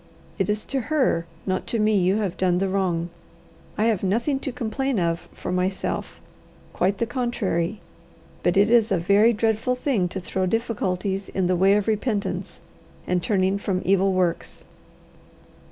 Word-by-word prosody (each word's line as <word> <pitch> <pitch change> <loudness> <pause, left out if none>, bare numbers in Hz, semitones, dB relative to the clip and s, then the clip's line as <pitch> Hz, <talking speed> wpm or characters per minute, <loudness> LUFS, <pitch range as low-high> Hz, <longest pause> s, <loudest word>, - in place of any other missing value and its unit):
It - - 0
is 210 0 -1
to 270 -1 -2
her, 260 - +1 0.2
not 185 -1 -2
to 235 - 0
me, 215 0 +2
you 190 0 +3
have 200 -5 -2
done 180 -1 +1
the 195 +2 +1
wrong. 180 -3 -1 0.7
I 215 - +1
have 220 -4 +2
nothing 235 +9 0
to 270 - -4
complain 250 +1 -2
of 170 -1 -1
for 180 - -6
myself 185 +1 -2 0.5
quite 190 +3 +1
the 230 - 0
contrary. 220 -6 -2 0.6
But 175 - +1
it 205 +3 +4
is 230 -2 +4
a 190 - +3
very 200 +7 +4
dreadful 225 +2 0
thing 250 -8 0
to 190 - -5
throw 185 +1 -2
difficulties 195 -3 -1
in 190 - -1
the 180 +1 +2
way 190 +3 +4
of 210 0 0
repentance 215 -1 -2 0.4
and 180 -1 0
turning 195 0 +1
from 190 -2 -2
evil 195 +1 +3
works." 180 -2 -1
195 Hz, 165 wpm, -24 LUFS, 185-225 Hz, 0.7 s, it